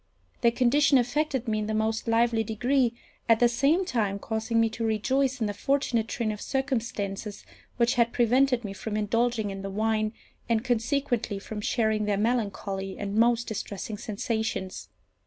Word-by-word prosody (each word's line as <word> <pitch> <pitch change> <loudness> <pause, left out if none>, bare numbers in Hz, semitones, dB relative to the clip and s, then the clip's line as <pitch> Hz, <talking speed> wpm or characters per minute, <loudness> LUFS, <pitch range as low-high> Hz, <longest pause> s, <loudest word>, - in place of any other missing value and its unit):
Their 235 - +5
condition 275 +4 +4
affected 265 +1 0
me 215 -1 0
in 210 - -2
the 215 - -1
most 220 +1 -1
lively 230 0 +2
degree, 240 +3 +1 0.3
at 225 -1 +6
the 240 - +6
same 280 +10 +2
time 210 - 0
causing 220 +2 -1
me 225 - +4
to 230 - -4
rejoice 255 +5 +1
in 225 - 0
the 205 - -2
fortunate 235 0 0
train 230 -2 -1
of 210 - -6
circumstances 225 -7 -3 0.3
which 235 -1 +3
had 235 -1 +2
prevented 250 +1 +3
me 195 - -4
from 210 +2 -4
indulging 220 0 0
in 195 0 -6
the 195 - -5
wine, 215 +1 0 0.4
and 230 +1 +1
consequently 245 -2 0
from 210 +2 -6
sharing 220 -1 +1
their 205 -1 +1
melancholy 200 -4 -1
and 200 -1 -4
most 235 +1 +3
distressing 210 0 -5
sensations. 220 -2 -3
225 Hz, 165 wpm, -27 LUFS, 215-245 Hz, 0.4 s, at